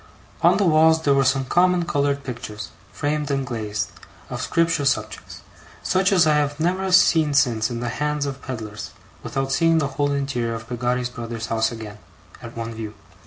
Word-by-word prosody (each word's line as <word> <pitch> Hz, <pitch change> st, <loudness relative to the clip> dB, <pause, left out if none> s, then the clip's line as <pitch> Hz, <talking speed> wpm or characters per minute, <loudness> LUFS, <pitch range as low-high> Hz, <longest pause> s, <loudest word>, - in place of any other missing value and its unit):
On -, -, +5 dB
the 205 Hz, -, +2 dB
walls 160 Hz, 0 st, +4 dB
there 140 Hz, -, +4 dB
were 135 Hz, 0 st, +3 dB
some 135 Hz, 0 st, +1 dB
common 180 Hz, +3 st, +3 dB
coloured 140 Hz, -2 st, 0 dB
pictures, 105 Hz, -5 st, -7 dB, 0.2 s
framed 150 Hz, 0 st, -2 dB
and 135 Hz, -1 st, 0 dB
glazed, 105 Hz, -4 st, -3 dB, 0.4 s
of -, -, -4 dB
scripture 165 Hz, -3 st, +1 dB
subjects; 140 Hz, -, -2 dB, 0.4 s
such 190 Hz, +2 st, +2 dB
as 180 Hz, -4 st, +5 dB
I 155 Hz, -1 st, +4 dB
have 145 Hz, 0 st, -1 dB
never 185 Hz, +3 st, 0 dB
seen 160 Hz, -5 st, +4 dB
since 120 Hz, -6 st, +2 dB
in 120 Hz, -1 st, -4 dB
the 120 Hz, -, -2 dB
hands 150 Hz, +3 st, -1 dB
of 140 Hz, -1 st, -5 dB
pedlars, 110 Hz, -5 st, -6 dB, 0.3 s
without 135 Hz, 0 st, -3 dB
seeing 165 Hz, +3 st, +3 dB
the 140 Hz, -3 st, +1 dB
whole 145 Hz, 0 st, +2 dB
interior 135 Hz, -5 st, -1 dB
of 110 Hz, 0 st, -8 dB
Peggotty's 125 Hz, 0 st, -1 dB
brother's 115 Hz, -1 st, -5 dB
house 115 Hz, +1 st, +1 dB
again, 110 Hz, -3 st, -8 dB, 0.4 s
at 115 Hz, 0 st, -10 dB
one 115 Hz, 0 st, -4 dB
view. 110 Hz, -1 st, -7 dB
135 Hz, 180 wpm, -22 LUFS, 115-155 Hz, 0.4 s, On